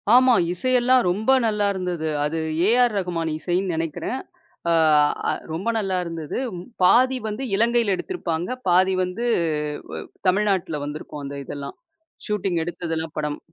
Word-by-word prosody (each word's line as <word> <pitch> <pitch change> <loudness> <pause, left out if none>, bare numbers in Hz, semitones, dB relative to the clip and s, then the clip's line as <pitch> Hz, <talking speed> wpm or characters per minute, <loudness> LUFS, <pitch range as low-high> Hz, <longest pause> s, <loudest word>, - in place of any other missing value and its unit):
ஆமா, 255 0 +6 0.2
இசையெல்லாம் 255 +5 +3
ரொம்ப 215 +7 +1
நல்லா 210 -2 +1
இருந்தது. 180 -4 -3 0.2
அது 155 +2 -2 0.3
ஏ.ஆர்.ரஹ்மான் 195 -9 +2
இசைன்னு 180 +2 -1
நெனைக்கிறேன். 165 - -3 0.5
அ - - +4 0.8
ரொம்ப 175 +7 -4
நல்லா 195 -3 -1
இருந்தது. 165 -3 -5 0.5
பாதி 255 +7 +5
வந்து 215 +5 -4
இலங்கையில 230 -1 +3
எடுத்திருப்பாங்க. 175 - -3 0.2
பாதி 185 +2 +4
வந்து 185 +6 -3 0.7
அ - - -3 0.3
தமிழ்நாட்டுல 190 -5 +1
வந்துருக்கும், 150 0 -7
அந்த 140 +1 -6
இதெல்லாம். 140 0 -7 0.5
ஷூட்டிங் 195 -5 0
எடுத்ததெல்லாம் 165 -2 -4
படம். 150 -1 -2
185 Hz, 120 wpm, -23 LUFS, 165-220 Hz, 0.8 s, ஆமா